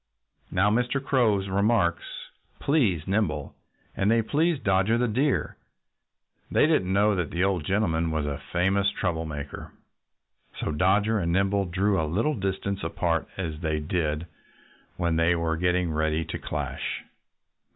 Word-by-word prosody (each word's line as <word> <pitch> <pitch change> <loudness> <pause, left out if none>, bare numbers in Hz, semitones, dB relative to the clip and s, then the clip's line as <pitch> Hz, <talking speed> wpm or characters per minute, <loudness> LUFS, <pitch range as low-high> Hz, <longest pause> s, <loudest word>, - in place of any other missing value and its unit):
Now, 100 +3 +2
Mr. 125 +5 +1
Crow's 115 -8 +1
remarks 100 -2 +1 0.5
pleased 110 - +1
Nimble. 95 -8 -1 0.4
And 100 - +1
they 115 0 +3
pleased 155 +3 +1
Dodger 95 +4 +3
the 125 +1 +1
Deer. 130 +6 0 0.9
They - - +4
didn't 150 - +2
know 105 +2 +3
that 90 -6 -1
the 90 +2 -1
old 95 -5 0
gentleman 85 -5 +1
was 80 -2 -1
a 70 -1 -4
famous 95 +3 +2
trouble 85 -5 -2
maker. 70 -2 -7 0.9
So - - -2
Dodger 100 +7 +2
and 85 -2 -1
Nimble 95 +2 +2
drew 95 +1 +1
a 80 - -1
little 115 - +1
distance 100 - -3
apart, 85 0 -1
as 80 -5 -4
they 80 -2 -1
always 75 0 -5
did 80 -2 -1 0.7
when 85 -2 0
they 85 +1 +3
were 85 -1 0
getting 90 0 +1
ready 80 +1 0
to - - -5
clash. - - -4
95 Hz, 150 wpm, -26 LUFS, 80-105 Hz, 0.9 s, They